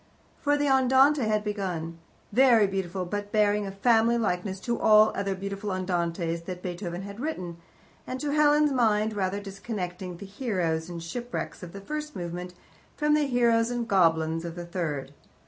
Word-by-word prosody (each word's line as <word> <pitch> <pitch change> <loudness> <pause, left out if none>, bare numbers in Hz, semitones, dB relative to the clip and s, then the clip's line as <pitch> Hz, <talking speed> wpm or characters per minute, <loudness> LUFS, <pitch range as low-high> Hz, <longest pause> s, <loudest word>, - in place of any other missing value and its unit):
For 290 0 +2
the 290 - 0
Andante 265 +2 +4
had 215 -1 +1
begun 180 -6 -4 0.3
very 240 -3 +6
beautiful, 190 -1 -3
but 205 +2 -4
bearing 210 -1 +2
a - - -5
family 230 +3 +3
likeness 190 -3 -1
to 235 +2 -2
all 215 0 +6
the - - -5
other 195 -1 -1
beautiful 200 +2 -4
Andantes 170 -2 -2
that 180 0 -6
Beethoven 175 0 -5
had 200 +2 -8
written, 185 - -4 0.5
and, 255 - -4
to 295 0 -2
Helen's 300 0 +4
mind, 220 -4 +2
rather 195 -1 -1
disconnecting 190 -3 -6
the 200 - -9
heroes 185 -7 -2
and 170 -1 -6
shipwrecks 240 +8 -5
of 175 -2 -8
the 200 - -9
first 300 +7 -5
movement 180 +1 -5 0.4
from 300 0 +2
the 300 -1 +3
heroes 235 -2 +3
and 240 -1 -2
goblins 165 -4 +2
of 170 -1 -6
the 175 -1 -6
third. 150 -6 -4
200 Hz, 170 wpm, -27 LUFS, 180-235 Hz, 0.5 s, very